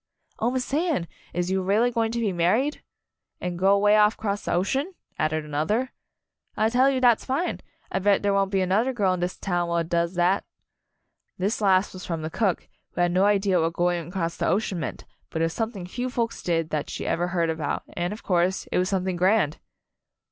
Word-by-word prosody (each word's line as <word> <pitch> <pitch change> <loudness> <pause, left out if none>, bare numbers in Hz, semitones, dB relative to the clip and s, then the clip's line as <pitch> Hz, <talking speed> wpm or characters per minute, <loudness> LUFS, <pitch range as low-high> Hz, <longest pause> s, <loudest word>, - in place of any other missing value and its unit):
"Oh, 230 - +2
Miss 255 +1 -3
Anne, 305 - +1 0.2
is 175 +1 -2
you 190 0 +1
really 210 +6 +2
going 225 -1 0
to 235 - -2
be 210 -5 0
married?" 215 - +1 0.6
"An' 180 -1 -3
go 195 +3 +4
'way 205 +1 +4
off 210 +1 +4
'cross 205 -2 -3
the - - -2
ocean?" 270 - 0 0.2
added 155 0 0
another. 165 - -1 0.7
"I 220 - +3
tell 255 +3 +4
you 265 -1 +1
dat's 245 -3 +4
fine! 275 +7 -1 0.3
I - - 0
bet 200 +1 +2
der 200 0 +2
won't 195 -1 +2
be 195 -1 +1
anudder 215 +8 +1
girl 195 -5 +2
in 180 - -3
dis 180 +1 -2
town 175 -2 -1
what 170 -1 0
does 170 +1 0
datl" 180 +3 +3 1.0
This 200 +5 -1
last 195 -1 +3
was 185 -1 -9
from 165 -2 -4
the 160 - -4
cook, 200 -3 0 0.3
who - - -1
had 175 0 +3
no 185 +2 +3
idea 195 -3 +3
what 165 +1 0
going 175 -1 0
across 170 -2 -3
the - - 0
ocean 195 -3 0
meant, 150 - -5 0.2
but 160 - -1
it - - +4
was 165 - -2
something 220 -5 -3
few 245 +8 -4
folks 235 -2 -2
did 165 -2 -1
that 150 -1 -2
she - - -5
ever 175 +1 0
heard 170 -2 0
about, 160 -2 -3
and, 175 0 -2
of 210 - -7
course, 180 0 +1
it - - +2
was 185 +1 +1
something 185 -2 -1
grand! 185 -4 +2
190 Hz, 215 wpm, -25 LUFS, 175-220 Hz, 1.0 s, go